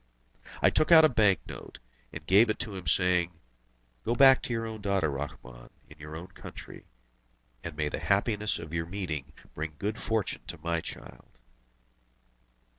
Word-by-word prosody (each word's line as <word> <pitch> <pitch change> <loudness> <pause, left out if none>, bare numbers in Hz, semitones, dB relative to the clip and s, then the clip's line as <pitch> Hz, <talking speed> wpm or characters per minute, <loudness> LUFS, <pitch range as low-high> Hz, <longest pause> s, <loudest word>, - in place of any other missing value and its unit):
I - - +6
took 155 - +2
out 160 -1 +10
a - - +5
bank 105 - +3
note, - - -10 0.3
and 80 - -8
gave 100 +7 +5
it 110 - 0
to 110 -4 -4
him, 90 -3 -7
saying: 90 0 +2 0.6
"Go 120 - 0
back 135 +1 +7
to - - -5
your 115 -1 -1
own 110 -1 -6
daughter, 100 -6 +1
Rahmun, 65 -4 -7 0.2
in 75 - -15
your 75 +1 -8
own 85 +2 -6
country, - - -11 0.8
and 85 -3 -7
may 75 -1 0
the - - -3
happiness 105 +1 +1
of 80 -1 -9
your 80 0 -2
meeting 85 -7 -4 0.2
bring 80 0 -5
good 105 +6 -3
fortune 110 -2 -1
to 85 - -6
my 85 -1 0
child!" - - -10
90 Hz, 170 wpm, -29 LUFS, 80-110 Hz, 0.8 s, out